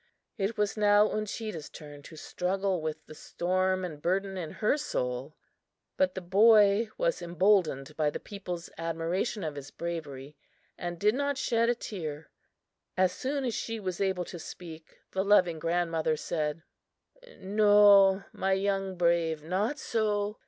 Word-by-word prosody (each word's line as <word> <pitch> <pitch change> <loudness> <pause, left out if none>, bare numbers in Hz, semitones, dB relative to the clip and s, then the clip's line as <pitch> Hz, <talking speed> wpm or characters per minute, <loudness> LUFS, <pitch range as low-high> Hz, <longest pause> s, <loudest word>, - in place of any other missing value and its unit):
It 215 0 -2
was 210 -1 0
now 210 0 +4
Uncheedah's 215 -6 -4
turn 145 -1 -11
to 160 - -12
struggle 185 +3 -2
with 155 0 -5
the - - -11
storm 185 +3 -1
and 155 -4 -8
burden 195 +3 -1
in 175 -4 -4
her 215 - +1
soul. 130 - -3 0.6
But 185 -1 +1
the 190 - -4
boy 210 +3 +5
was - - 0
emboldened 170 -5 +1
by 150 -1 +1
the - - -5
people's 180 -4 -7
admiration 165 +6 -2
of 155 -2 -3
his 140 -1 -8
bravery, 150 -5 -6 0.4
and 175 0 -5
did 210 +5 +3
not 285 +1 -1
shed 230 -3 +1
a 240 - +2
tear. 160 -9 -6 0.7
As 185 -1 +3
soon 275 +4 -3
as 240 - -1
she 225 +1 -3
was 185 -2 -4
able 190 -2 0
to 175 - -8
speak, 160 -1 -11
the 190 - 0
loving 185 -5 +3
grandmother 165 -2 0
said: 155 0 -3 0.7
"No, 200 -1 +5
my 190 0 0
young 195 -1 -1
brave, 170 -3 +1
not 200 - -1
so! 210 -5 -1
185 Hz, 150 wpm, -29 LUFS, 165-205 Hz, 0.7 s, boy